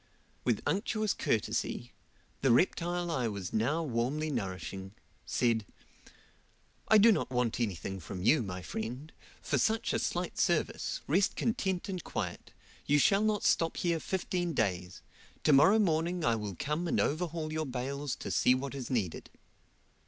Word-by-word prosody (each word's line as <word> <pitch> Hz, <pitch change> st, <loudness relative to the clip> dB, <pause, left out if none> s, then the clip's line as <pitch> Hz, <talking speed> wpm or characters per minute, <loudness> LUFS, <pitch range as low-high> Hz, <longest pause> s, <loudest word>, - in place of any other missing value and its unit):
With -, -, +1 dB
unctuous 215 Hz, +1 st, 0 dB
courtesy, 100 Hz, -, -1 dB, 0.5 s
the 135 Hz, -, +3 dB
reptile 175 Hz, +5 st, +1 dB
I 130 Hz, -7 st, 0 dB
was 100 Hz, -4 st, -5 dB
now 145 Hz, +10 st, +1 dB
warmly 145 Hz, +4 st, -1 dB
nourishing; 95 Hz, -, -5 dB, 0.3 s
said, 115 Hz, -3 st, +1 dB, 1.2 s
"I 220 Hz, -, +7 dB
do 220 Hz, +2 st, +7 dB
not 205 Hz, -, 0 dB
want 125 Hz, -3 st, 0 dB
anything 95 Hz, -4 st, -2 dB
from 90 Hz, +1 st, -7 dB
you, 150 Hz, +7 st, +5 dB
my 90 Hz, -4 st, -5 dB
friend, 120 Hz, -, -5 dB, 0.3 s
for -, -, +1 dB
such 220 Hz, +1 st, +1 dB
a -, -, +1 dB
slight -, -, -2 dB
service, -, -, 0 dB
rest 200 Hz, -, +2 dB
content 190 Hz, -6 st, -1 dB
and 185 Hz, -3 st, -4 dB
quiet; -, -, -5 dB, 0.4 s
you 145 Hz, -, +4 dB
shall 195 Hz, +7 st, +4 dB
not 215 Hz, -1 st, +1 dB
stop 165 Hz, 0 st, +2 dB
here 170 Hz, -2 st, +1 dB
fifteen 175 Hz, -1 st, -2 dB
days. 90 Hz, -6 st, -1 dB, 0.4 s
To 150 Hz, -, +5 dB
morrow 190 Hz, +10 st, +7 dB
morning 170 Hz, -3 st, +1 dB
I 115 Hz, -, +3 dB
will 105 Hz, -4 st, -4 dB
come 150 Hz, +5 st, -2 dB
and -, -, +1 dB
overhaul 155 Hz, 0 st, -1 dB
your 155 Hz, -1 st, -2 dB
bales 135 Hz, +2 st, -3 dB
to -, -, -4 dB
see 125 Hz, -, +4 dB
what 135 Hz, +1 st, -4 dB
is 135 Hz, -3 st, -5 dB
needed." 105 Hz, -10 st, -2 dB
145 Hz, 150 wpm, -31 LUFS, 110-175 Hz, 1.2 s, I